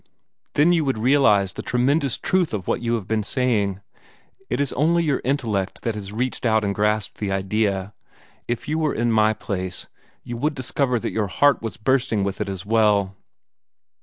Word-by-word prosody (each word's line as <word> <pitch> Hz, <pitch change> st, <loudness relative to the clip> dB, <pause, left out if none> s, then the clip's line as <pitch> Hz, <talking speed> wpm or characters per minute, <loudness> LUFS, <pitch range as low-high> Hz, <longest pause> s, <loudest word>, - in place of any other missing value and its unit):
"Then 160 Hz, +4 st, +5 dB
you 165 Hz, -2 st, +2 dB
would 135 Hz, -4 st, 0 dB
realize 110 Hz, -6 st, +3 dB
the -, -, -6 dB
tremendous 135 Hz, +3 st, +1 dB
truth 180 Hz, -10 st, 0 dB
of 95 Hz, -4 st, -6 dB
what -, -, 0 dB
you 120 Hz, 0 st, 0 dB
have 105 Hz, -5 st, -5 dB
been 110 Hz, -1 st, 0 dB
saying. 105 Hz, -4 st, 0 dB, 0.7 s
It -, -, -1 dB
is 140 Hz, -2 st, 0 dB
only 170 Hz, +5 st, +2 dB
your 150 Hz, -4 st, 0 dB
intellect 115 Hz, -8 st, -1 dB
that 115 Hz, -, -1 dB
has 100 Hz, -2 st, -7 dB
reached 125 Hz, +4 st, -2 dB
out 110 Hz, -2 st, +2 dB
and 100 Hz, -1 st, 0 dB
grasped 105 Hz, 0 st, -1 dB
the 100 Hz, -2 st, -2 dB
idea. 95 Hz, 0 st, -1 dB, 0.5 s
If 120 Hz, +5 st, -3 dB
you 155 Hz, +2 st, 0 dB
were 155 Hz, -2 st, 0 dB
in 120 Hz, +1 st, +1 dB
my 110 Hz, -1 st, +4 dB
place, 95 Hz, -4 st, -4 dB, 0.4 s
you 120 Hz, -, -6 dB
would 150 Hz, +4 st, -1 dB
discover 130 Hz, -1 st, 0 dB
that -, -, -3 dB
your 110 Hz, -2 st, 0 dB
heart 145 Hz, +8 st, +3 dB
was 115 Hz, -1 st, -5 dB
bursting 120 Hz, -3 st, +1 dB
with 100 Hz, 0 st, -3 dB
it -, -, -2 dB
as 95 Hz, -1 st, -5 dB
well." 105 Hz, -3 st, +2 dB
110 Hz, 190 wpm, -23 LUFS, 100-135 Hz, 0.7 s, Then